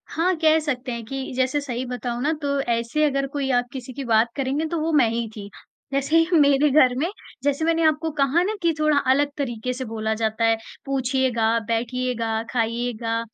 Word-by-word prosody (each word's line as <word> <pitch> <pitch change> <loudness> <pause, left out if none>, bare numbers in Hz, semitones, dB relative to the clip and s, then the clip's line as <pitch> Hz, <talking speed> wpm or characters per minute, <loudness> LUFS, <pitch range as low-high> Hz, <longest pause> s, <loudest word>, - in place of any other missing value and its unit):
हाँ, 360 +3 +1
कह 315 0 +4
सकते 260 -4 -3
हैं 235 -1 -4
कि 270 +3 -5
जैसे 260 +3 +1
सही 255 -2 -4
बताऊँ 245 -1 -4
ना 300 - +2
तो 280 -1 0
ऐसे 235 +4 0
अगर 275 -1 0
कोई 280 -2 -1
आप 245 -1 +2
किसी 255 -1 -7
की 275 - -5
बात 225 0 +3
करेंगे 275 +3 -1
तो 335 - -2
वो 320 +1 -1
मैं 275 -6 +5
ही 230 0 -2
थी। 200 -2 -8 0.4
जैसे 275 +4 +2
ही 330 +1 +3
मेरे 285 0 +4
घर 260 -3 +5
में 320 +6 0 0.3
जैसे 285 +2 +1
मैंने 330 0 +2
आपको 315 +1 +2
कहा 280 +4 +3
ना 415 +4 -1
कि 335 -1 +2
थोड़ा 305 -1 +3
अलग 285 +2 +3
तरीके 250 -3 -3
से 260 +1 -5
बोला 220 -1 -2
जाता 220 0 -1
है, 225 0 +3 0.3
पूछिएगा, 255 -4 +1
बैठिएगा, 230 -1 -1
खाइएगा, 230 -1 -1
260 Hz, 200 wpm, -23 LUFS, 235-290 Hz, 0.4 s, मैं